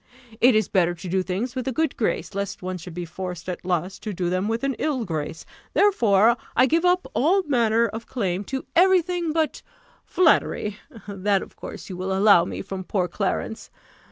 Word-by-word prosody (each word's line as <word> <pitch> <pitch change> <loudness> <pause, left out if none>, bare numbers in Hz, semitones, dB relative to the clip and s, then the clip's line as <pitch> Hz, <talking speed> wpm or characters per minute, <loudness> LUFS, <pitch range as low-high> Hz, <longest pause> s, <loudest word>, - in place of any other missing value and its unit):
It 245 -1 +5
is 215 - +2
better 175 -3 +2
to 175 +2 -9
do 185 +2 +1
things 195 +7 -3
with 255 0 -3
a - - +1
good 315 +3 0
grace, 215 -2 -1
lest 200 -1 -4
one 185 0 -4
should 165 0 -10
be 175 -1 -4
forced 180 +1 -6
at 180 -2 -5
last 180 +1 -2
to 215 - -4
do 175 0 -1
them 185 +2 0
with 225 +2 -2
an 275 0 +1
ill 270 -7 -1
grace. 160 -1 -4 0.3
Therefore 230 - +4 0.2
I 255 - +6
give 330 +5 +2
up 360 0 +3
all 370 +8 +3
manner 235 -6 +2
of 225 +1 -6
claim 195 -6 -2
to 265 +4 -4
every 370 0 +5
thing 350 -2 -2
but 315 -1 -1 0.4
flattery! 215 - +2 0.3
that 200 -1 0
of - - -14
course - - -9
you 185 - -7
will 190 +1 -2
allow 200 -4 +6
me - - -5
from 190 -1 -6
poor 185 -1 -1
Clarence. 200 +4 -3
210 Hz, 200 wpm, -24 LUFS, 185-265 Hz, 0.4 s, I